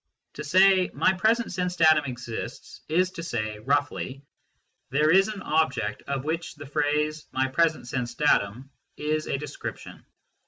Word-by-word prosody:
To 150 - -7
say 185 +4 +5
" - - -28
My - - +3
present 225 +5 +1
sense 180 0 -2
datum 155 -3 +5
exists 120 -2 -7
" - - -40
is 185 0 +2
to 170 - -7
say 110 -9 -3
(roughly): 140 +1 -1 0.3
" - - -49
There 150 +3 +3
is 195 +2 +5
an 210 -2 -6
object 150 -9 0
of 140 -2 -2
which 165 +2 -3 0.8
my 130 0 +1
present 160 -1 +1
sense 120 -1 -3
datum 130 -2 +1 0.3
is 155 +1 -1
a - - -1
description." 150 +2 -8
150 Hz, 155 wpm, -26 LUFS, 130-175 Hz, 0.8 s, say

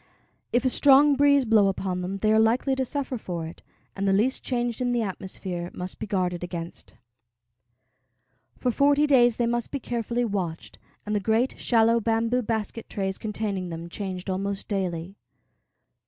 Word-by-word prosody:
If 245 +2 +1
a - - +4
strong 285 +2 +6
breeze 280 -1 +4
blow 215 -3 +4
upon 190 -1 -2
them, 190 +2 -3
they 215 +2 +2
are 220 - +5
likely 235 +5 +2
to 265 0 0
suffer 270 -2 -3
for 170 -5 -4
it, 160 - -10 0.3
and 195 0 -1
the 195 - +3
least 230 +7 +1
change 240 -2 -2
in 245 -1 +1
the 235 -1 +1
atmosphere 185 -3 -5
must 180 +1 -6
be - - -5
guarded 180 -3 -1
against. 170 -1 -7 1.6
For 250 - 0
forty 285 +3 +3
days 245 -5 +5
they 240 - 0
must 240 0 -1
be 280 - -3
carefully 240 0 -2
watched, 185 -7 -4 0.3
and 210 0 -2
the - - +2
great, 225 +5 0
shallow, 230 -1 +3
bamboo 230 +2 +1
basket 225 0 -3
trays 195 -1 -3
containing 205 -4 -3
them 165 0 -6
changed 185 -1 -5
almost 195 +1 -3
daily. 185 -2 -3
215 Hz, 170 wpm, -26 LUFS, 190-245 Hz, 1.6 s, strong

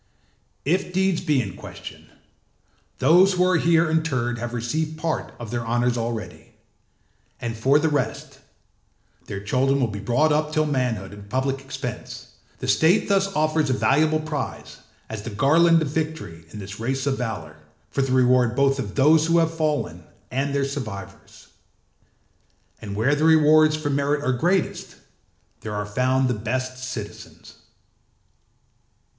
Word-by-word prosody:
If 180 +5 0
deeds 190 -1 +1
be 150 -3 +1
in 100 -7 -4
question, - - -11 0.9
those 180 +8 +5
who 180 0 +2
are 185 -2 +3
here 165 0 +3
interred 130 -7 0
have 120 +1 -4
received 155 +7 -2
part 160 0 -2
of 115 -3 -8
their 120 -1 -2
honours 120 +1 +1
already, 115 -2 -5 0.8
and 115 -1 -4
for 135 +6 +3
the 155 +2 +1
rest, 145 -7 -2 0.9
their 100 - -5
children 135 +6 +1
will 130 - +3
be 105 -1 -6
brought 120 +9 +2
up 150 0 0
till 155 0 +1
manhood 125 -9 -2
at - - -10
the 100 - -13
public 135 +2 -1
expense: 135 0 -7 0.3
the - - -6
state 175 +8 +3
thus 195 -1 +3
offers 155 -1 +1
a - - +2
valuable 155 +4 +2
prize, 150 -5 -5 0.3
as 110 -2 -6
the 110 - -6
garland 165 +10 +4
of 145 - -3
victory 150 - -4
in 105 - -10
this 105 +1 -8
race 130 +4 -2
of 135 -2 0
valour, 95 -11 -5 0.3
for 140 - 0
the 135 -1 -1
reward 125 -2 +3
both 140 0 +2
of 100 -7 -5
those 155 +3 +4
who 165 +1 +3
have 165 -1 +2
fallen 150 - -2 0.3
and 135 +2 -1
their 140 -1 +1
survivors. 125 -8 -8 1.3
And 100 -3 -6
where 115 +7 +2
the 145 +1 0
rewards 155 -1 +5
for 155 -2 -2
merit 140 +1 0
are 130 - +1
greatest, 175 +8 -1 0.6
there 105 -1 -6
are 105 0 -2
found 130 +5 +1
the 125 - +1
best 130 +4 -3
citizens. 120 -5 -8
135 Hz, 155 wpm, -23 LUFS, 120-155 Hz, 1.3 s, those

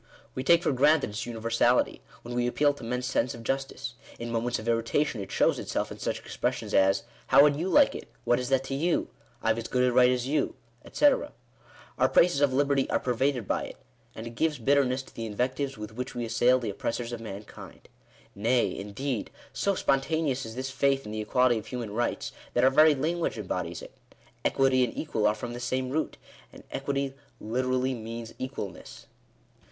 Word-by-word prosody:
We 130 - -3
take 170 +5 +5
for - - +2
granted 145 -1 +3
its 105 +3 -4
uni 115 -2 -5
versality, 115 +2 +2 0.2
when 120 - -7
we 120 0 +1
appeal 145 +3 +2
to 140 - -12
men's 125 +2 -2
sense 125 -1 0
of 115 - -10
justice. 135 -1 -3 0.2
In 120 0 -5
moments 120 +1 0
of 110 - -8
irritation 115 +2 +1
it 95 - -7
shows - - +2
itself - - -2
in - - -8
such - - -2
expressions - - -3
as 95 0 +4
— - - -27
"How 140 - +7
would 145 -1 +4
you 170 +6 -2
like 290 +4 +5
it? - - -7
" - - -33
" - - -36
What 120 - +3
is 125 - -3
that 135 -1 +2
to 135 - -5
you 165 +5 0 0.2
?" - - -33
"I've 115 0 +2
as 115 - -5
good 125 0 +1
a 125 -1 +3
right 125 0 +6
as 125 -1 0
you," 150 +2 0 0.4
&c. - - +2 0.9
Our - - +4
praises 165 -5 +4
of 145 -2 +4
liberty 140 0 +2
are - - +2
pervaded 125 -2 0
by - - 0
it; - - -10 0.4
and 110 - -7
it 115 - -6
gives 150 +5 0
bitterness 130 +1 +2
to - - -18
the 115 -1 -5
invectives 130 +5 -2
with 105 +1 -7
which 125 +3 -5
we 120 -1 -2
assail 125 +3 +3
the 115 -5 -3
oppressors 115 +4 -3
of 115 - -5
mankind. 105 -1 -10 0.5
Nay, 115 +5 +1
indeed, 110 +4 -4 0.2
so 200 -1 0
spontaneous 135 -3 0
is 110 - -8
this 130 +1 -4
faith 135 0 +1
in 105 - -6
the 110 0 -3
equality 120 +2 +3
of - - -12
human 120 -4 -5
rights, 120 +2 -1 0.2
that 120 - +3
our 130 - +6
very 155 +2 +6
lan 160 +6 -1
guage 165 - -1
embodies 90 -4 -4
it. - - -12 0.5
Equity 135 -1 +3
and 120 - -3
equal 110 -9 0
are 105 - +2
from 120 +2 -6
the 120 - -6
same 130 +1 -2
root; 155 +3 -2 0.3
and - - -14
equity 140 0 -2 0.3
literally 130 +3 0
means 115 0 -7
equalness. 130 -8 -7
125 Hz, 210 wpm, -28 LUFS, 115-135 Hz, 0.9 s, How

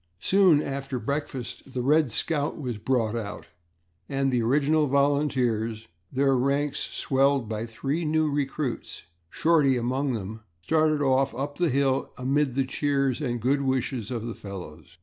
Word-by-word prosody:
Soon 180 - +4
after 135 -1 -4
breakfast 135 0 -4
the 125 - -2
"Red 150 +1 +3
Scout" 145 +6 -1
was 125 -7 -4
brought 115 -2 0
out 105 -3 -5 0.6
and 135 -1 0
the 125 -2 +2
original 145 +5 +2
volunteers, 130 -6 +1 0.2
their 135 0 +2
ranks 140 +3 0
swelled 135 -2 +1
by 110 +1 -3
three 140 +8 -2
new 155 0 +2
recruits, 140 -2 -3 0.3
Shorty 150 - +3
among 130 +3 -1
them, 110 0 -5 0.2
started 155 - +2
off 135 -1 +2
up 145 +4 -4
the 175 -2 +3
hill 135 0 +1
amid 135 +1 0
the 135 -1 +1
cheers 140 0 0
and 120 -4 -1
good 135 +5 +1
wishes 130 -4 -1
of 115 -3 -3
the 115 - -4
fellows. 90 -8 -10
135 Hz, 150 wpm, -26 LUFS, 120-145 Hz, 0.6 s, Soon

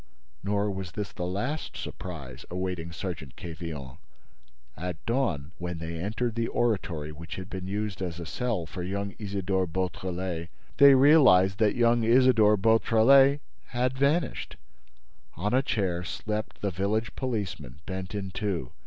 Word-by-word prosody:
—" 60 +1 -40
Nor 100 +1 0
was 95 -3 -6
this 105 -2 -4
the 90 - -4
last 125 +12 -3
surprise 70 -9 -7
awaiting 90 -2 -3
Sergeant 80 -5 -6
Quevillon. 80 -6 -7 0.8
At 90 -1 -6
dawn, 115 - 0
when 90 -1 -4
they 80 +1 -5
entered 110 +6 -2
the 115 0 -1
oratory 90 -10 -1
which 80 +2 -8
had 95 +1 -8
been 95 -1 -5
used 105 0 -3
as 90 -2 -3
a 85 - -5
cell 105 +2 -2
for 90 +4 -7
young 100 +2 -3
Isidore 95 -3 -1
Beautrelet, 90 -1 -3 0.3
they 140 -1 +9
realized 130 -10 +6
that 105 -2 +3
young 120 -1 +3
Isidore 115 -3 +5
Beautrelet 115 +6 +5 0.2
had 125 +1 -1
vanished. 140 +2 0 0.8
On 105 +6 -1
a 130 - +5
chair 95 -9 -1
slept 105 +4 -4
the 100 - 0
village 100 +5 -1
policeman, 100 - -4
bent 95 +1 -5
in 100 -2 -4
two. 95 - -3
95 Hz, 145 wpm, -28 LUFS, 85-115 Hz, 0.8 s, they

